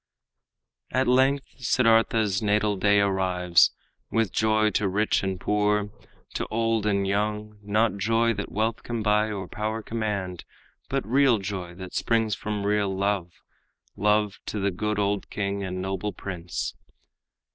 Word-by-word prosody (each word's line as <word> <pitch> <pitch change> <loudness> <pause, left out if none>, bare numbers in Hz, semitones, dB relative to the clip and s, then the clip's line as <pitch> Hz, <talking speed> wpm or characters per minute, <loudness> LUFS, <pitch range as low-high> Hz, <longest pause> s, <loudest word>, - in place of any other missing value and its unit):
At 130 0 +1
length 135 +2 +3
Siddartha's 115 -4 +3
natal 105 0 +2
day 100 +1 +3
arrives 90 -3 +3 0.4
With 115 -3 +1
joy 110 0 +2
to 100 +1 +1
rich 105 +3 +1
and 95 -1 -2
poor, 105 0 +1 0.4
to - - -3
old 115 -1 0
and 100 -1 +1
young 105 +1 -2
Not 105 0 +1
joy 115 +3 +2
that 100 -2 -5
wealth 110 +2 -1
can 115 -2 -4
buy 105 +1 +2
or 95 -3 -4
power 110 +3 -3
command, 100 -6 -3 0.5
But - - -1
real 130 +1 +4
joy, 95 -3 -5
that 95 0 -9
springs 115 -2 +1
from 105 0 -3
real 105 -1 +1
love, 95 -2 -1 0.6
Love 105 0 +1
to - - -3
the 100 0 +1
good 105 +3 -2
old 100 0 -1
king 100 -1 -2
and 95 -1 -4
noble 95 +2 -3
prince. 85 -3 -5
105 Hz, 145 wpm, -26 LUFS, 100-110 Hz, 0.6 s, real